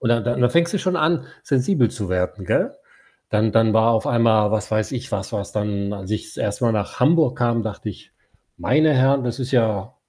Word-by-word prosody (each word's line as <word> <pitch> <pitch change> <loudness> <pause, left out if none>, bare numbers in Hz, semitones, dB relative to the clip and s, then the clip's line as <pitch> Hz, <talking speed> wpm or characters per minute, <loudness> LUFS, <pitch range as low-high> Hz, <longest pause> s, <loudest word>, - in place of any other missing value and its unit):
Und 115 - -1
da 115 0 +3
da 120 +2 -1
und - - -4
da 125 - +4
fängst 170 +5 +2
du - - +1
schon 185 -1 -1
an, 160 +1 +1 0.2
sensibel 130 - +1
zu 105 -6 -6
werden, 95 +1 -2
gell? - - +1 0.6
Dann 110 0 +1
dann 115 -1 +3
war 110 +1 +4
auf 110 -1 0
einmal, 110 -3 +3
was 105 -1 -2
weiß 110 0 0
ich 130 -1 -6
was 100 +1 -3
was, 100 -3 -4
dann 105 -1 -2
als 100 0 -7
ich 110 - -2
das - - -13
1. 105 +4 -2
Mal 115 - +3
nach 105 -2 -3
Hamburg 155 -5 +3
kam, 120 -1 +1
dachte 105 0 -6
ich: 100 - -15 0.4
„Meine 155 -1 +2
Herren, 135 +1 +3
das 120 +1 -3
ist 130 +1 -4
ja“ 110 -6 0
115 Hz, 230 wpm, -21 LUFS, 105-130 Hz, 0.6 s, da